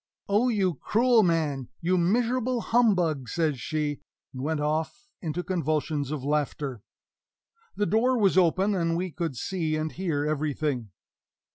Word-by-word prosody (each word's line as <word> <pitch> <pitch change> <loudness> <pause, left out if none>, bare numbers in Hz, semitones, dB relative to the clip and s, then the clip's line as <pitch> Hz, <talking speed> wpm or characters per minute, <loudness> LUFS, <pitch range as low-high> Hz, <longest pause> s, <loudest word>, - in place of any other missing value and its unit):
"Oh, 210 +5 +3
you 195 -6 +1
cruel 235 +1 +4
man 155 - 0
you 180 +2 +1
miserable 240 +7 +1
humbug!" 180 - +2
says 155 -6 0
she; 150 0 -2 0.3
and 130 - -6
went 155 +2 -1
off 160 - -2
into 170 +1 -3
convulsions 155 -5 -1
of 150 -3 -4
laughter. 145 -4 -2 0.9
The 205 - +1
door 245 +5 +2
was 200 -5 +3
open, 190 +3 +3
and 165 -3 0
we 180 0 -2
could 160 -4 -3
see 160 +1 -1
and 155 0 -2
hear 160 -6 -2
everything. 150 -5 -1
165 Hz, 140 wpm, -27 LUFS, 150-200 Hz, 0.9 s, cruel